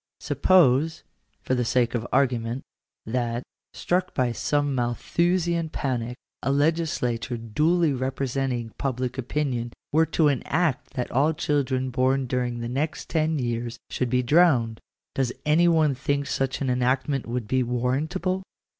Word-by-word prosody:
> -, -, -64 dB
V -, -, -13 dB
Suppose, 160 Hz, -2 st, +3 dB, 0.4 s
for -, -, -1 dB
the 125 Hz, -1 st, +1 dB
sake 120 Hz, 0 st, +1 dB
of 120 Hz, -1 st, -2 dB
argument, 125 Hz, -2 st, +1 dB, 0.4 s
that, 120 Hz, +1 st, -2 dB, 0.3 s
struck 180 Hz, +1 st, -1 dB
by 125 Hz, -2 st, +1 dB
some 145 Hz, +4 st, 0 dB
Malthusian 170 Hz, +7 st, 0 dB
panic, 125 Hz, -5 st, -2 dB, 0.3 s
a 135 Hz, -, 0 dB
legislature 140 Hz, -5 st, 0 dB
duly 150 Hz, +8 st, +1 dB
representing 130 Hz, -2 st, -2 dB
public 130 Hz, -1 st, -2 dB
opinion 125 Hz, -3 st, -2 dB, 0.2 s
were 160 Hz, +2 st, +4 dB
to 160 Hz, 0 st, +2 dB
enact 145 Hz, +1 st, 0 dB
that 125 Hz, -2 st, -3 dB
all 145 Hz, +6 st, +3 dB
children 130 Hz, -4 st, 0 dB
born 130 Hz, +1 st, +1 dB
during 125 Hz, -1 st, -2 dB
the 115 Hz, -, -3 dB
next 140 Hz, +6 st, -3 dB
ten 160 Hz, -1 st, +1 dB
years 120 Hz, -2 st, -2 dB
should 125 Hz, -, -1 dB
be 125 Hz, +1 st, +2 dB
drowned. 125 Hz, -6 st, +3 dB, 0.3 s
Does 130 Hz, -3 st, 0 dB
any 160 Hz, +3 st, +4 dB
one 160 Hz, -4 st, +4 dB
think 140 Hz, +2 st, -1 dB
such 135 Hz, -1 st, -2 dB
an 130 Hz, -2 st, +1 dB
enactment 130 Hz, +2 st, 0 dB
would 120 Hz, -2 st, -3 dB
be 130 Hz, +3 st, +2 dB
warrantable 150 Hz, +10 st, -1 dB
130 Hz, 145 wpm, -25 LUFS, 125-150 Hz, 0.4 s, were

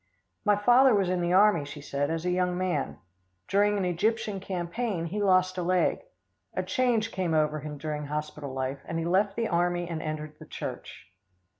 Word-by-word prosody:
"My 210 Hz, -1 st, +4 dB
father 245 Hz, +4 st, +5 dB
was 190 Hz, -3 st, +1 dB
in 180 Hz, -1 st, 0 dB
the 175 Hz, +1 st, +1 dB
army," 195 Hz, -4 st, +5 dB
she 145 Hz, +1 st, -8 dB
said, 145 Hz, 0 st, -2 dB
"as 165 Hz, +1 st, -2 dB
a 180 Hz, -, +1 dB
young 180 Hz, 0 st, +1 dB
man. 180 Hz, -6 st, -1 dB, 0.5 s
During 205 Hz, +1 st, +3 dB
an 195 Hz, -, 0 dB
Egyptian 200 Hz, +3 st, 0 dB
campaign, 185 Hz, +1 st, -3 dB
he 200 Hz, +5 st, -3 dB
lost 185 Hz, -1 st, +3 dB
a -, -, 0 dB
leg. 180 Hz, +1 st, +2 dB, 0.6 s
A -, -, 0 dB
change 235 Hz, -3 st, +1 dB
came 180 Hz, -4 st, -1 dB
over 155 Hz, 0 st, +2 dB
him 150 Hz, 0 st, -7 dB
during 150 Hz, 0 st, -4 dB
hospital 150 Hz, -1 st, -4 dB
life, 130 Hz, +1 st, -3 dB
and 165 Hz, -, -4 dB
he 165 Hz, -, -2 dB
left 195 Hz, +3 st, +2 dB
the 230 Hz, -1 st, 0 dB
army 175 Hz, -1 st, 0 dB
and 165 Hz, -2 st, -4 dB
entered 155 Hz, -1 st, -5 dB
the -, -, -12 dB
church." -, -, -7 dB
180 Hz, 190 wpm, -28 LUFS, 155-200 Hz, 0.6 s, father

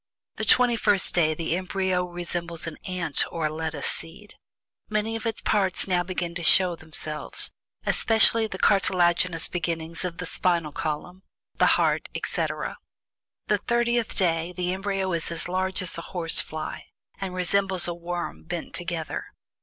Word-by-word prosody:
The -, -, -1 dB
TWENTY 245 Hz, -2 st, +4 dB
FIRST 200 Hz, -3 st, +3 dB
DAY 155 Hz, -3 st, +3 dB
the 165 Hz, +1 st, -1 dB
embryo 185 Hz, 0 st, -1 dB
resembles 175 Hz, -1 st, -4 dB
an 165 Hz, -2 st, -6 dB
ant 180 Hz, -6 st, 0 dB
or 165 Hz, -2 st, -2 dB
a -, -, +1 dB
lettuce 160 Hz, -2 st, -3 dB
seed. 185 Hz, +6 st, -4 dB, 0.6 s
Many 215 Hz, +1 st, -1 dB
of 225 Hz, +1 st, -3 dB
its 225 Hz, -, -1 dB
parts 195 Hz, -4 st, +2 dB
now 180 Hz, -2 st, +2 dB
begin 175 Hz, -1 st, -3 dB
to 170 Hz, 0 st, -5 dB
show 175 Hz, +3 st, +6 dB
themselves, 155 Hz, -1 st, -1 dB, 0.3 s
especially 225 Hz, 0 st, +4 dB
the -, -, -6 dB
cartilaginous 175 Hz, -3 st, +2 dB
beginnings 165 Hz, -1 st, -3 dB
of 175 Hz, -2 st, -4 dB
the -, -, -4 dB
spinal 170 Hz, -4 st, 0 dB
column, 160 Hz, +5 st, -4 dB, 0.4 s
the -, -, +6 dB
heart, -, -, +1 dB
etc. -, -, -2 dB, 0.7 s
The -, -, +1 dB
THIRTIETH 235 Hz, -1 st, 0 dB
DAY 170 Hz, -2 st, +1 dB
the 180 Hz, 0 st, 0 dB
embryo 195 Hz, -1 st, -2 dB
is 165 Hz, -1 st, -1 dB
as 170 Hz, 0 st, -4 dB
large 185 Hz, +1 st, -1 dB
as 175 Hz, -, -3 dB
a 165 Hz, -, -9 dB
horse 165 Hz, -2 st, +4 dB
fly, 155 Hz, 0 st, -6 dB, 0.3 s
and 190 Hz, -2 st, -4 dB
resembles 185 Hz, 0 st, +3 dB
a 175 Hz, -, -2 dB
worm, 175 Hz, 0 st, -5 dB
bent 175 Hz, 0 st, -5 dB
together. 170 Hz, -2 st, -3 dB
175 Hz, 155 wpm, -25 LUFS, 165-190 Hz, 0.7 s, show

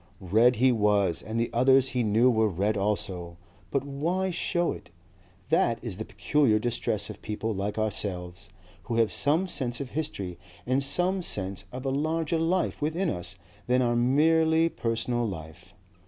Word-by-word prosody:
Red 110 Hz, +6 st, +3 dB
he 130 Hz, +3 st, +4 dB
was 105 Hz, -6 st, +2 dB
and 110 Hz, +1 st, -4 dB
the 115 Hz, -, -1 dB
others 130 Hz, +2 st, +4 dB
he 125 Hz, -, -1 dB
knew 115 Hz, +3 st, +4 dB
were 110 Hz, -2 st, +2 dB
red 100 Hz, +4 st, 0 dB
also, 95 Hz, -4 st, -2 dB, 0.3 s
but 140 Hz, -1 st, 0 dB
why 170 Hz, +7 st, -1 dB
show 175 Hz, 0 st, 0 dB
it? -, -, -9 dB, 0.6 s
That 115 Hz, -, +2 dB
is 110 Hz, -7 st, -3 dB
the 110 Hz, -, -5 dB
peculiar 140 Hz, -8 st, +2 dB
distress 120 Hz, +2 st, -1 dB
of -, -, -12 dB
people 110 Hz, +1 st, -3 dB
like 100 Hz, +2 st, -3 dB
ourselves, 90 Hz, -5 st, -2 dB, 0.4 s
who 115 Hz, -, -3 dB
have 115 Hz, -2 st, +2 dB
some 160 Hz, +7 st, +1 dB
sense 125 Hz, -8 st, -2 dB
of 140 Hz, -3 st, -6 dB
history 100 Hz, -, -4 dB, 0.3 s
and 130 Hz, +2 st, +1 dB
some 180 Hz, +7 st, +1 dB
sense 95 Hz, -, -3 dB
of 130 Hz, +2 st, -7 dB
a 135 Hz, -, 0 dB
larger 160 Hz, +3 st, 0 dB
life 170 Hz, +1 st, 0 dB
within 160 Hz, +4 st, 0 dB
us 90 Hz, +1 st, -4 dB, 0.3 s
than 125 Hz, +1 st, +3 dB
our 120 Hz, -1 st, +1 dB
merely 160 Hz, +6 st, +3 dB
personal 120 Hz, -2 st, -1 dB
life. 85 Hz, +1 st, -9 dB
120 Hz, 165 wpm, -27 LUFS, 105-145 Hz, 0.6 s, he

